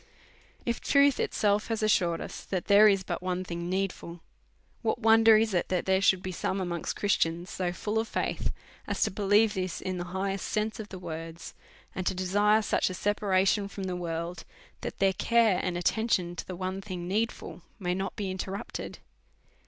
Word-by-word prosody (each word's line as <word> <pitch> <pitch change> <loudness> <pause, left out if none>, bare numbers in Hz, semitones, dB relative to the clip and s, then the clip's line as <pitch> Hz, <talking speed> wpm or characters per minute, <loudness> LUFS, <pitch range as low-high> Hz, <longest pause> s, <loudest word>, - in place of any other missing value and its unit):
If 235 -1 -1
truth 280 -1 +4
itself 210 0 +1
hath 225 -1 -2
assured 175 -6 +2
us - - -7
that 185 -2 -3
there 205 +1 +7
is 195 -2 +3
but - - -4
one 185 0 -2
thing 170 -1 -5
needful, 185 -3 -3 0.6
Avhat 220 - +1
wonder 225 0 +6
is 220 -1 +1
it 175 - 0
that 180 -1 0
there 190 0 +2
should 190 -2 +3
be 185 - -3
some 190 +2 -2
amongst 175 -3 -3
Christians 175 -3 0
so 180 -2 -1
full 210 +5 -2
of 225 - -2
faith - - -2 0.4
as - - 0
to - - 0
believe 205 +2 +3
this 185 -2 -3
in 185 -1 -3
the 175 - -3
highest 195 +2 -3
sense 215 +2 -1
of 210 -1 -7
the 190 - -7
words, 165 -1 -7 0.4
and 185 -1 -3
to - - +1
desire 205 +4 +3
sucli 210 - +1
a - - -4
separation 200 0 +1
from 200 0 -7
the 185 -1 -2
world, 170 0 -4 0.4
that - - -5
their 195 -1 +3
care 225 -1 +3
and 180 -1 -2
attention 180 -1 0
to - - -6
the 185 - -5
one 185 +2 -3
thing 185 -3 -6
needful 220 +5 -2 0.2
may 180 -4 -1
not 190 +1 -3
be 195 -3 -3
inter 190 +1 -4
rupted 200 - -6
190 Hz, 190 wpm, -29 LUFS, 180-210 Hz, 0.6 s, there